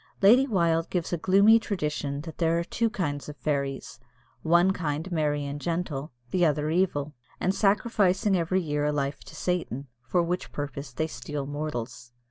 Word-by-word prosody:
Lady 245 +7 +7
Wilde 170 -7 +1
gives 175 -1 -2
a - - +1
gloomy 200 +6 +6
tradition 150 -9 -2
that 160 0 -9
there 165 -1 +2
are 170 - 0
two 230 +6 0
kinds 145 - -3
of 150 - -8
fairies 140 -4 -2 0.4
one 175 +3 +4
kind 160 0 -3
merry 150 -3 0
and 140 +1 -5
gentle, 165 -4 -3 0.2
the 180 - +2
other 150 -1 +2
evil, 155 -5 0 0.3
and 185 - +1
sacrificing 200 -1 +2
every 185 +2 +1
year 150 -3 -1
a 150 - +2
life 140 -1 -2
to - - -13
Satan, 150 -7 -2 0.2
for 175 +8 +2
which 175 +2 -3
purpose 145 0 -5
they 145 +6 -1
steal 145 -1 -5
mortals. 135 -5 -5
160 Hz, 170 wpm, -27 LUFS, 145-180 Hz, 0.4 s, Lady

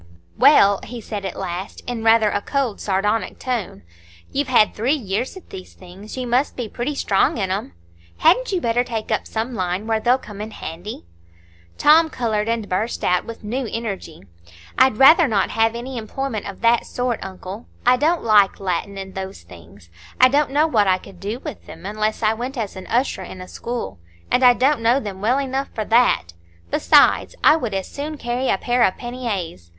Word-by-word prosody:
"Well," 200 - +5
he 245 0 -7
said 205 -2 -6
at 190 - -4
last, 185 0 -5
in 240 -2 -4
rather 225 -2 +4
a 205 - -1
cold, 265 -3 -2
sardonic 210 +3 -1
tone, 230 - -4 0.5
"you've 285 0 -1
had 240 -5 +4
three 245 +7 +1
years 235 - -3
at 375 - -15
these 185 -1 -9
things,—you 200 +7 -8
must 245 +4 +1
be 245 -3 -4
pretty 245 +7 -4
strong 200 -4 +1
in 190 -3 -1
'em. 185 - -3 0.4
Hadn't 415 +10 +3
you 375 - +1
better 240 -3 +1
take 225 -3 -5
up - - -1
some 230 +3 -3
line 185 -1 -2
where 225 -1 0
they'll 245 +3 +3
come 210 -5 -10
in 215 - -5
handy?" 175 - -8 0.7
Tom 320 +2 +5
coloured, 220 -5 -1
and 230 -2 -1
burst 210 +6 -2
out, 180 0 +1
with 230 -1 -9
new 245 +4 -3
energy: 200 - -5 0.5
"I'd 260 -3 +4
rather 310 +5 +7
not 210 -5 0
have 225 0 +1
any 245 +1 -5
employment 225 0 -4
of 195 - -10
that 235 0 +3
sort, 245 -2 -2
uncle. 190 +3 -8 0.2
I 250 +1 +6
don't 320 +6 +1
like 210 -3 +4
Latin 195 +1 -3
and 190 0 -7
those 190 - -7
things. 85 +1 -16 0.3
I 255 - +7
don't 285 +2 +2
know 290 +3 +3
what 220 -10 +2
I 185 -1 +4
could 185 0 -15
do 205 +5 -4
with 300 -8 -8
them - - -11
unless 215 +2 -2
I 215 0 +3
went 250 +4 -5
as 215 -4 -4
usher 210 +3 -1
in 185 0 -9
a 185 - -8
school; 240 - -5 0.3
and 255 - +3
I 250 -1 +8
don't 265 0 +2
know 235 +4 +3
them 200 -6 -7
well 240 +5 +2
enough 270 0 -2
for 215 - -2
that! 225 - +2 0.4
besides, - - +4
I 305 - +7
would 235 -10 -3
as 190 -1 -3
soon 300 +2 -6
carry 245 +1 -2
a - - +2
pair 245 +4 0
of 190 - +3
panniers. 205 - -5
225 Hz, 195 wpm, -21 LUFS, 195-250 Hz, 0.7 s, I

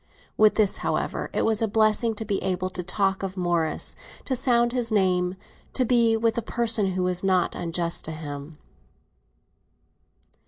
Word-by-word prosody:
With 215 -1 +4
this, 210 -3 +3
however, - - -2
it - - 0
was 220 -1 +2
a 225 - +2
blessing 220 +2 +2
to 220 - -5
be 200 -2 -1
able 185 0 -2
to 180 - -3
talk 195 +2 0
of 195 0 -5
Morris, 175 -3 0 0.3
to 260 - -1
sound 240 -1 +2
his 240 -3 -1
name, 185 -3 +1 0.4
to 255 - +1
be 230 -2 +3
with 230 0 +1
a - - -3
person 225 -4 0
who 185 0 -1
was 180 0 0
not 185 -2 +2
unjust 170 0 -2
to 160 - -3
him. 150 -1 -7
195 Hz, 165 wpm, -25 LUFS, 180-225 Hz, 0.4 s, With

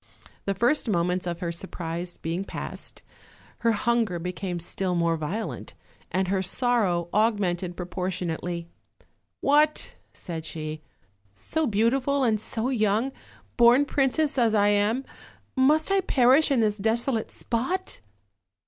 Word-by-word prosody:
The 195 - 0
first 240 +5 +2
moments 180 -1 0
of 170 +1 -4
her 170 -1 -1
surprise 170 0 -5
being 170 +4 -2
passed, - - -7 0.6
her 230 -1 +2
hunger 230 -4 +1
became 180 +1 -4
still 180 +2 -2
more 170 -1 +2
violent, 170 +8 -4 0.4
and 190 0 +1
her 190 0 +1
sorrow 190 -4 +1
aug 215 +1 +3
mented 175 -2 -2
proportionately. 180 -1 -3 0.7
"What!" 300 +2 +3 0.2
said 165 -3 -7
she, 155 -1 -6 0.5
"so 315 - -1
beau 225 +1 +3
tiful 275 +1 +1
and 220 -4 +2
so 225 +2 -2
young, 220 +1 +1 0.5
born 240 +4 +6
princess 280 +1 +1
as 225 -2 +3
I 205 0 +4
am, 210 +6 +1 0.5
must 300 +7 +3
I 390 0 +4
perish 270 -2 +4
in 265 -4 +3
this 210 -1 +1
desolate 225 +2 0
spot? 265 +11 -2
210 Hz, 130 wpm, -26 LUFS, 180-250 Hz, 0.7 s, born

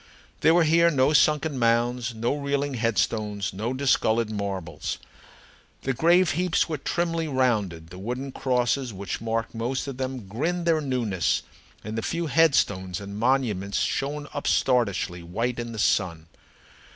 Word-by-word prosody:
There 160 - +5
were 175 - +5
here 165 +2 +5
no 140 -1 +3
sunken 150 -2 +3
mounds, 120 +1 +1
no 115 +3 0
reeling 140 0 -1
headstones, 105 -4 -1
no 110 +6 -3
discolored 115 -4 +1
marbles. 100 -4 -4 0.9
The 135 - 0
grave 170 +6 +4
heaps 180 +2 +1
were 155 -3 -3
trimly 165 +1 -1
rounded, 105 - 0
the 90 - -9
wooden 125 +7 -4
crosses 125 0 0
which 100 0 -5
marked 115 0 -2
most 120 +3 -2
of 135 -3 -6
them 130 -5 -4
grinned 165 - -2
their 165 -2 +3
newness, 120 - 0 0.4
and 110 +1 -5
the 115 - -1
few 170 +7 -2
headstones 105 - +2
and 100 +1 -7
monuments 115 -6 +1
shone 145 +2 -1
upstartishly 105 -10 +1
white 115 +9 -2
in 120 0 -4
the 115 - -7
sun. 85 -6 +1
125 Hz, 145 wpm, -25 LUFS, 105-140 Hz, 0.9 s, There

